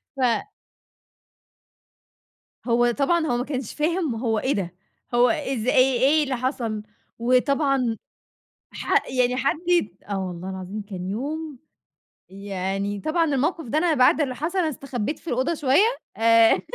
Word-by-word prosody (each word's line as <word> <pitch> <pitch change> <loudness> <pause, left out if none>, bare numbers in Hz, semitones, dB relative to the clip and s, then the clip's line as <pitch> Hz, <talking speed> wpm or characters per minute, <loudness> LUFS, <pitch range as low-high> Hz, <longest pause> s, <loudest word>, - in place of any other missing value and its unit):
ف 245 - +1 2.2
هو 240 0 +3
طبعًا 315 +6 +1
هو 240 - +1
ما 245 - -1
كنش 260 -5 -4
فاهم 315 -4 0
هو 225 -2 0
إيه 265 - 0
ده 180 -3 -3 0.4
هو 240 0 +5
إز 260 -3 -2
إيه 255 -1 +4
إيه 295 +4 +4
اللي 265 -2 -2
حصل؟ 235 -4 -2 0.4
وطبعًا 255 -1 +2 0.8
ح - - 0
يعني 250 -1 +1
حد 275 +3 +1
يت 210 - +1
آه 195 -1 -2
والله 180 +1 -6
العظيم 190 +3 -6
كان 185 -3 -7
يوم 290 +5 -4 0.7
يعني 195 +1 -3
طبعًا 330 +1 +1
الموقِف 300 +2 0
ده 270 +6 -1
أنا 325 0 +3
بعد 255 +3 +4
اللي 260 -3 -1
حصل 340 +7 -2
أنا 325 -3 +2
استخبيت 270 -1 -4
في - - -20
الأوضة 260 +6 0
شوية 330 - +3 0.2
آآ 230 0 +5
255 Hz, 145 wpm, -24 LUFS, 220-295 Hz, 2.2 s, هو